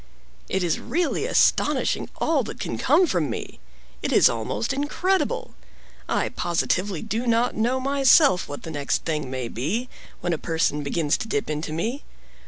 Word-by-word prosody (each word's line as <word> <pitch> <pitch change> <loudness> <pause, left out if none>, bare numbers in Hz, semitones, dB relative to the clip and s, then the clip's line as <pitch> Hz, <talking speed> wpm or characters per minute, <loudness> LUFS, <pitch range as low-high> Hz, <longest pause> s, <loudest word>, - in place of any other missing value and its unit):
"It 190 -1 0
is 170 -3 0
really 350 +1 -1
astonishing - - +2
all - - +1
that - - -8
can - - -4
come 370 - +4
from 170 - 0
me! 115 - -6 0.4
It - - -2
is - - +6
almost 115 - -2
incredible! 355 +7 -1 0.6
I - - +1
positively 175 +1 -1
do 225 +3 -2
not 235 +1 +2
know 240 +4 +1
myself 275 - +4
what 145 - -7
the 160 - -6
next 145 -2 -1
thing 150 -4 -2
may 130 -2 -3
be, 180 - -2 0.3
when 175 - -1
a 160 - -2
person 160 -3 0
begins 145 +1 0
to - - -4
dip 215 -5 -1
into 155 +1 -3
me. 225 - -2
180 Hz, 165 wpm, -24 LUFS, 150-250 Hz, 0.6 s, is